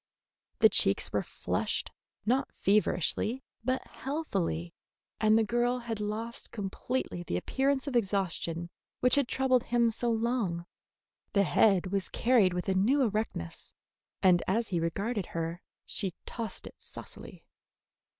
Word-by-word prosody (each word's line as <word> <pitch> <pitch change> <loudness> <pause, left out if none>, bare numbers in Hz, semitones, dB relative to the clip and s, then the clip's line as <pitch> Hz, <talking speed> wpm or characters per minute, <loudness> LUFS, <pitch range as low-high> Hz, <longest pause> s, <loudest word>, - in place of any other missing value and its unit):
The - - +9
cheeks - - +3
were - - +2
flushed, - - -2 0.3
not 255 +5 +1
feverishly, 210 - +1 0.2
but 255 +2 0
healthily, 195 - -3 0.5
and 215 0 +5
the 225 - +4
girl 240 +3 +1
had 235 -3 -4
lost 215 +3 -4
completely 205 -1 -3
the 130 - -2
appearance 270 - 0
of 280 -3 -3
exhaustion 180 -5 0 0.3
which 250 0 +3
had 280 -3 +5
troubled 255 -1 +2
him 235 -1 +3
so 240 +2 -1
long. 225 -7 0 0.7
The 200 - +4
head 190 -1 +3
was 195 -1 -1
carried 225 -7 +3
with 180 - -2
a 190 - +2
new 245 +10 +3
erectness, 210 - -3 0.5
and 180 -2 +6
as 225 +4 +1
he 175 -3 0
regarded 195 +5 -1
her 165 +2 -2 0.2
she 190 -4 -3
tossed 230 -2 -5
it - - -12
saucily. - - -8
215 Hz, 135 wpm, -30 LUFS, 185-245 Hz, 0.7 s, The